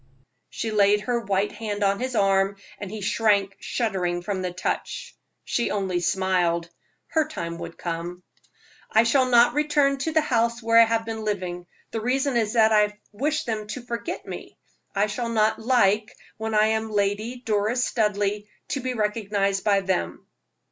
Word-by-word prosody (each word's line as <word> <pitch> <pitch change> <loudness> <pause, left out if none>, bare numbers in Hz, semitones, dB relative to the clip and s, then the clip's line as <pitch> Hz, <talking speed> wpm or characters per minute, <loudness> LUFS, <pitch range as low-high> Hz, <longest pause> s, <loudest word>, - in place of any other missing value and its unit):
She 225 - -4
laid 205 0 +4
her 240 +3 0
white 200 -2 0
hand 210 -1 -4
on 200 0 +2
his 255 0 -3
arm, 195 -1 +3 0.2
and 205 - -6
he 215 +1 -6
shrank 200 -2 +1
shuddering 180 -7 -1
from 190 0 -2
the 180 -1 -2
touch. 180 +1 -4 0.3
She 240 - 0
only 190 -3 -1
smiled 175 -2 0 0.4
her 315 -2 +1
time 170 - -5
would - - -8
come. 175 +1 -5 0.7
"I 220 - +5
shall 255 +3 +3
not 240 -1 +6
return 290 -2 +2
to 320 +4 -1
the 315 - +4
house 235 -5 +1
where 230 0 +6
I - - +7
have 225 0 0
been 225 -1 -4
living. 180 -4 -3 0.2
The 225 - -3
reason 265 +3 0
is 220 -3 +1
that 220 -2 +5
I 210 -1 +3
wish 300 +8 -1
them 220 -4 -3
to 225 +4 -6
forget 235 -1 -4
me. - - -8 0.4
I 200 +1 +3
shall 230 +3 -3
not 220 -1 +2
like, 220 -3 +3 0.3
when 220 0 -3
I 215 +1 +4
am 220 0 -1
Lady 210 +4 -1
Doris 220 +3 +1
Studleigh, 210 -2 0 0.2
to 280 - -1
be 255 -1 -3
recognized 205 -3 0
by 200 -2 +3
them." 135 - -2
215 Hz, 170 wpm, -25 LUFS, 195-235 Hz, 0.7 s, I